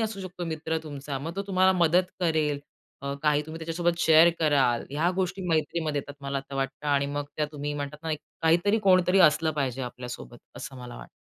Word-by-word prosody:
असू 220 -3 -2
शकतो 185 -1 -6
मित्र 160 0 -2
तुमचा 140 -2 -5
मग 165 +6 -6
तो 200 - -1
तुम्हाला 190 -1 +4
मदत 175 +2 +4 0.2
करेल. 155 -4 +1 0.4
अ, 140 0 -3
काही 150 -1 +3
तुम्ही 160 +1 -7
त्याच्यासोबत 170 +1 -1
शेअर 160 +1 +7
कराल. 140 -6 +2
या 155 +5 +1
गोष्टी 190 0 -1
मैत्रीमध्ये 155 -1 0
येतात 145 0 -12
मला 140 0 -2 0.2
वाटतं 135 +2 -3
आणि 140 -1 +2
मग 145 0 -3
त्या 150 -1 0
तुम्ही 145 0 -4
म्हणतात 145 0 -5
ना, 160 -1 -2 0.3
काहीतरी 175 +7 +3
कोणतरी 185 0 +5
असलं 160 +1 -1
पाहिजे 130 -1 -2
आपल्यासोबत 125 -1 -7 0.2
असं 135 - -7
मला 125 -1 -9
वाटतं. - - -11
155 Hz, 185 wpm, -27 LUFS, 140-170 Hz, 0.4 s, शेअर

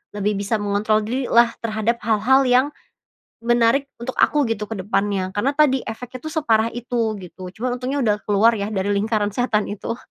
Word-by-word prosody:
lebih 205 0 -1
bisa 200 +3 -1
mengontrol 205 +1 +1
dirilah 235 -1 +2
terhadap 225 +1 0
hal-hal 230 +5 +3
yang 250 +2 +4 0.8
menarik 240 +4 +2
untuk 260 +2 -3
aku, 295 -1 +3
gitu, 215 -2 -2
ke 225 - -5
depannya. 195 -1 -1
Karena 225 +8 0
tadi 280 -4 +4
efeknya 250 +3 -7
tuh 315 - -5
separah 225 -5 +2
itu, 235 -2 -2
gitu, 185 0 -9
cuman 245 +2 -3
untungnya 265 +3 -2
udah 210 -2 +2
keluar 210 +3 +4
ya 200 - -2
dari 205 -1 -1
lingkaran 210 0 0
setan 215 -2 0
itu. 210 +3 -4
225 Hz, 170 wpm, -21 LUFS, 205-245 Hz, 0.8 s, yang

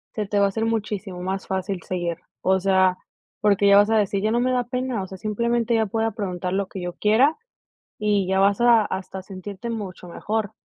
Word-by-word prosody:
se 215 - -1
te 205 +1 0
va 200 - +5
a - - +2
hacer 220 +3 -2
muchísimo 210 -4 -3
más 190 +1 -3
fácil 190 -1 -2
seguir, 175 -2 -3 0.2
o 190 0 +2
sea, 190 -1 +3 0.4
porque 205 -1 +3
ya 200 0 +7
vas 205 +1 +5
a 225 - +3
decir: 200 -1 +1
"Ya 215 - +2
no 235 - +2
me 255 +1 +1
da 250 -1 +1
pena", 250 -3 -2
o 190 - -7
sea, 190 - -9
simplemente 235 +3 0
ya 220 -1 +2
puedo 225 +2 -1
preguntar 180 -3 -3
lo 195 0 0
que 190 - -7
yo 175 0 -4
quiera, 235 - +3 0.6
y 205 -3 +1
ya 190 0 +1
vas 200 +2 +3
a 235 -3 +5
hasta 190 0 -5
a 190 - -7
sentirte 200 +4 -7
mucho 190 -5 -6
mejor. 210 +3 -3
200 Hz, 225 wpm, -23 LUFS, 190-225 Hz, 0.6 s, ya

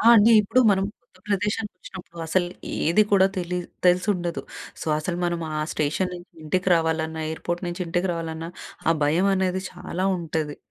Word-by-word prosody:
ఆ! - - -1
అండి 225 +1 +7
ఇప్పుడు 255 +5 +3
మనం 195 -1 +2 0.2
కొత్త 215 -6 -26
ప్రదేశానికి 205 +1 -1
వచ్చినప్పుడు 175 -2 -11
అసలు 175 +2 +1 0.4
ఏది 175 +6 +5
కూడా 190 -1 +6
తెలి 180 0 -2 0.3
తెలిసుండదు. 180 -1 +2 0.4
సో, - - -6
అసలు 170 +3 -3
మనం 170 -1 -1
ఆ - - -1
స్టేషన్ 155 +5 0
నుంచి 175 0 -11
ఇంటికి 180 +4 0
రావాలన్నా, 160 -1 0
ఎయిర్పోర్ట్ 175 +2 -3
నుంచి 175 +1 -5
ఇంటికి 175 +2 0
రావాలన్నా, 165 0 -4 0.4
ఆ 165 - +6
భయం 165 +6 +3
అనేది 190 0 0
చాలా 180 +1 -4
ఉంటాది. 155 -3 -3
175 Hz, 165 wpm, -24 LUFS, 165-190 Hz, 0.4 s, అండి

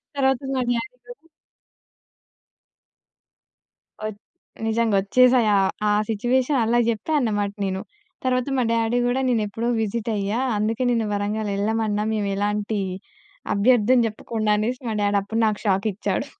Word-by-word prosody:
తర్వాత 265 -2 +2
మా 260 - 0
డ్యాడీ 240 +1 -2
కోసం 245 +7 -13 2.8
ఒచ్ 215 -1 -5 0.5
నిజంగా. 225 -2 +1
వచ్చేసాయి. 250 +3 +4
ఆహ్, 195 -1 +2 0.2
ఆ - - +3 0.2
సిచ్యువేషన్ 250 +5 +1
అలా 235 +2 +2
జెప్పా 230 +7 -2
అన్నమాట 205 -5 0
నేను. 190 0 -2 0.4
తర్వాత 255 0 0
మా 255 - +2
డ్యాడీ 230 +1 +1
గూడా 245 +2 +1
నేనెప్పుడో 225 0 -1
విసిటయ్యా. 215 0 -1 0.2
"అందుకే 225 +4 0
నిన్ను 230 -2 +1
వరంగల్ 205 +1 -2
యెళ్ళమన్నాం 215 0 0
మేము 205 -2 -1
ఎలాంటి 210 +1 -1 0.8
అభ్యర్థన 240 +3 +4
చెప్పకుండా" 215 0 -2
అనేసి 245 +5 -2
మా 220 - -2
డ్యాడీ 205 0 +2
అప్పుడు 225 +3 -3
నాకు 210 -1 0
షాక్ 195 +1 +1
ఇచ్చాడు. 195 - -2
220 Hz, 130 wpm, -23 LUFS, 205-245 Hz, 2.8 s, వచ్చేసాయి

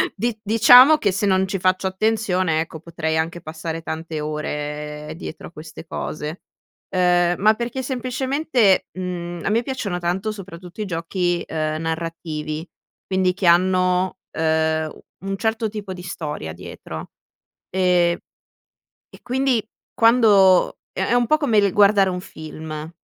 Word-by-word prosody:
di 230 +2 -2
diciamo 245 +7 +8
che 200 - +1
se 190 +2 -1
non 190 -1 +2
ci 195 +1 -2
faccio 185 +1 +1
attenzione, 190 -4 0
ecco, 160 0 -6
potrei 160 -1 -3
anche 165 +2 -2
passare 160 +1 -5
tante 160 0 -5
ore 150 0 -4
dietro 165 - -8
a - - -14
queste 155 0 -10
cose. 155 +1 -5 0.5
Ehm, 175 -1 +3
ma 215 +1 +6
perché 240 +3 -3
semplicemente, 260 -3 +1
mhmm, 175 -2 -4
a - - +1
me 230 +3 +2
piacciono 230 -9 -3
tanto 185 +5 -1
soprattutto 180 -2 -9
i 210 - -1
giochi, 175 0 -1
ehm, 155 0 -2
narrativi, 160 -1 -4 0.4
quindi 185 -1 +1
che 185 -1 -1
hanno, 185 +1 +3 0.2
ehm, 160 0 +1
u - - -14 0.3
un 195 - -2
certo 220 +1 -1
tipo 205 -2 -6
di 180 -1 -9
storia 150 - -5
dietro, 85 - -9 0.6
e 180 -2 +2 0.9
e - - -16
quindi 255 -2 0 0.3
quando 215 -6 +5
è 190 - -2
è 235 - 0
un 245 -1 +3
po' 305 - +4
come 280 -8 +1
il 200 -2 +4
guardare 200 -1 +5
un 180 -1 -3
film, 155 -1 -8
180 Hz, 145 wpm, -22 LUFS, 160-210 Hz, 0.9 s, diciamo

